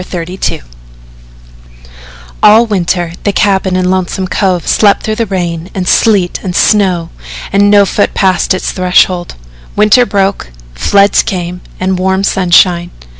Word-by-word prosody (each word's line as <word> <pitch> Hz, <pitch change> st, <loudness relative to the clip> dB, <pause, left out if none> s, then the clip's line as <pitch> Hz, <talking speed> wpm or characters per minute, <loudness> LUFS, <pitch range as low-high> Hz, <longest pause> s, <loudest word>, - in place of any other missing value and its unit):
XXXII 180 Hz, -, -5 dB, 1.8 s
All 215 Hz, +3 st, +5 dB
winter 175 Hz, -5 st, -2 dB
the 205 Hz, -, 0 dB
cabin 190 Hz, -2 st, 0 dB
in 185 Hz, 0 st, 0 dB
Lonesome 185 Hz, 0 st, -2 dB
Cove 185 Hz, -3 st, -1 dB
slept 205 Hz, -2 st, +2 dB
through 215 Hz, +1 st, -2 dB
rain 175 Hz, -2 st, -4 dB
and 185 Hz, -2 st, -3 dB
sleet 200 Hz, -6 st, +1 dB
and 180 Hz, -2 st, -5 dB
snow, 185 Hz, -6 st, +1 dB, 0.4 s
and 200 Hz, +1 st, +3 dB
no 205 Hz, -1 st, +5 dB
foot 205 Hz, -, -1 dB
passed 185 Hz, -1 st, +1 dB
its 185 Hz, -, -3 dB
threshold. 180 Hz, -1 st, 0 dB, 0.4 s
Winter 215 Hz, +4 st, +3 dB
broke, 195 Hz, -, -1 dB, 0.2 s
floods 200 Hz, -, +2 dB
came 180 Hz, -1 st, -5 dB, 0.2 s
and 185 Hz, 0 st, -1 dB
warm 190 Hz, +1 st, 0 dB
sunshine. 175 Hz, -2 st, +2 dB
185 Hz, 125 wpm, -10 LUFS, 180-200 Hz, 1.8 s, All